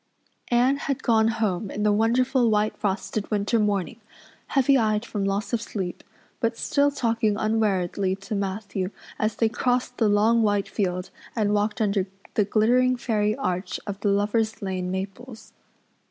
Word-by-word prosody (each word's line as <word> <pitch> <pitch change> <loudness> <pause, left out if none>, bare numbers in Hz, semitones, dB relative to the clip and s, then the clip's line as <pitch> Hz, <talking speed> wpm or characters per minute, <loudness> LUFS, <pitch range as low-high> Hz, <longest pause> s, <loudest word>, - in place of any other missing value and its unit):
Anne 250 +3 +3
had 280 -1 -3
gone 220 -2 +4
home 215 -3 -1
in 210 - -3
the 210 - +4
wonderful, 240 +3 +2
white 210 0 +1
frosted 200 +1 -2
winter 210 +2 +1
morning, 205 -3 -1 0.5
heavy 275 0 +3
eyed 215 -2 +1
from 205 -4 -3
loss 200 +2 -1
of 235 - +1
sleep, 190 -6 -5 0.4
but 230 0 0
still 285 0 +2
talking 230 -5 0
unweariedly 200 -4 0
to 195 +2 -7
Matthew 195 -1 -2 0.3
as 215 0 0
they 225 - +2
crossed 245 +2 -1
the 220 -3 +4
long 220 +3 +4
white 205 -2 +1
field 180 -2 -2 0.2
and 210 -3 +1
walked 210 +1 0
under 200 -3 +1 0.3
the 210 - +2
glittering 245 +5 +3
fairy 215 -3 0
arch 185 -8 -2
of 200 -1 -5
the 205 - 0
Lover's 210 +2 +1
Lane 185 -2 -2
maples. 200 +6 -6
215 Hz, 155 wpm, -25 LUFS, 200-230 Hz, 0.5 s, gone